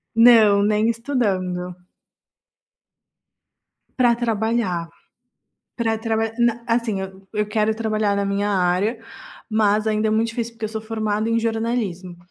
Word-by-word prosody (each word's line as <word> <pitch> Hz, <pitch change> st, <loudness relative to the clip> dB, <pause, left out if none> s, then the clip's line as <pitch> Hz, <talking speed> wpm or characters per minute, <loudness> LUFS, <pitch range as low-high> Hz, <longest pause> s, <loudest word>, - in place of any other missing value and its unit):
Não, 225 Hz, -4 st, +6 dB
nem 215 Hz, +2 st, +2 dB
estudando. 190 Hz, -8 st, -2 dB, 2.2 s
Pra 245 Hz, -2 st, +4 dB
trabalhar, 220 Hz, -7 st, -1 dB, 0.9 s
pra 225 Hz, -2 st, 0 dB
traba 225 Hz, 0 st, -1 dB
na 235 Hz, -1 st, +1 dB
assim, 230 Hz, -4 st, 0 dB
eu 190 Hz, 0 st, -9 dB
eu 210 Hz, -1 st, 0 dB
quero 215 Hz, +1 st, +1 dB
trabalhar 215 Hz, -2 st, 0 dB
na 200 Hz, 0 st, 0 dB
minha 200 Hz, +1 st, -1 dB
área, 190 Hz, +4 st, +1 dB, 0.5 s
mas 215 Hz, 0 st, +2 dB
ainda 215 Hz, 0 st, +1 dB
é -, -, -1 dB
muito 220 Hz, +1 st, +2 dB
difícil, 230 Hz, 0 st, -4 dB
porque 225 Hz, -1 st, -4 dB
eu -, -, -4 dB
sou 220 Hz, 0 st, -5 dB
formada 215 Hz, 0 st, -2 dB
em 230 Hz, -, +2 dB
jornalismo 225 Hz, -6 st, -2 dB
220 Hz, 130 wpm, -21 LUFS, 200-230 Hz, 2.2 s, Não